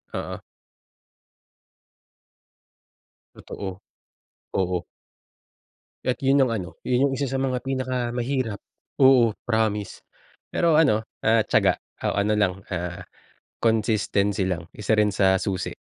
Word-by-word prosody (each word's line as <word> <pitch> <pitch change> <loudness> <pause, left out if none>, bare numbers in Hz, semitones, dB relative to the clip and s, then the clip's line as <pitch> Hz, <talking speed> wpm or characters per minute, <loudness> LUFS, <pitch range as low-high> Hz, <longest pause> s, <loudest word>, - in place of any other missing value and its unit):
oo. - - -5 2.9
Totoo. 95 0 -7 0.8
Oo. 90 -2 0 1.2
At 125 - -1
iyun 135 0 +4
ang 120 - -2
ano, 90 -6 -3 0.2
iyun 130 +3 +2
'yung - - -2
1 140 - 0
sa 135 0 -2
mga 130 -2 0
pinakamahirap, 125 -3 -2 0.4
oo, 125 -4 +6
promise, 110 -3 -1 0.5
pero 165 -2 +3
ano, 135 -9 +4 0.2
ah, 110 0 +5
tiyaga - - +2 0.2
o - - +1
ano 100 +1 +1
lang, 100 -3 +2 0.2
ah, 90 -2 -4 0.6
consistency 105 -3 +1
lang. 90 -3 -3
1 105 +1 -1
rin 105 -1 +4
sa 95 -1 +3
susi, 95 -1 -2
110 Hz, 110 wpm, -24 LUFS, 100-130 Hz, 2.9 s, oo